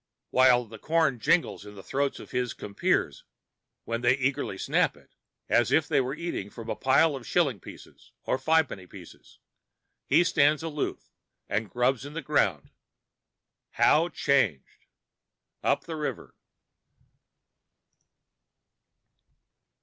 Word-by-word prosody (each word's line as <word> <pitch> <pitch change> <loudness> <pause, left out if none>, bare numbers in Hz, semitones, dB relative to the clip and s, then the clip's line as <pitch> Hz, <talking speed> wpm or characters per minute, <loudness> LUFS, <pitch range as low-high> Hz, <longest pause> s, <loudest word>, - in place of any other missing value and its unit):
While 125 -1 +5
the 110 -1 -12
corn 155 -5 +1
jingles 160 - +1
in 105 0 -12
the 95 - -11
throats 140 0 -2
of - - -12
his 125 -2 -2
compeers 100 -1 -1 0.6
when 115 0 -3
they 120 +2 +3
eagerly 130 -7 -1
snap - - +1
it, - - -23 0.3
as - - +2
if - - +3
they - - +2
were 130 +2 -3
eating 165 - -4
from 115 +1 -7
a - - -2
pile 140 +3 +3
of 130 -3 -9
shilling 140 - +1
pieces - - -14
or 130 - -1
fi' 160 +4 +3
penny 95 -10 -10
bits, 90 -3 -14 0.7
he 160 +5 +5
stands 155 -3 +2
aloof 150 -3 -4 0.4
and 105 +1 -2
grubs 125 +3 0
in 145 +1 -9
the 165 -1 -5
ground. 100 - 0 1.0
How 165 +3 +3
changed!—Up 130 - -3
the 165 - -6
River. 150 -1 -5
130 Hz, 125 wpm, -27 LUFS, 110-150 Hz, 1.0 s, While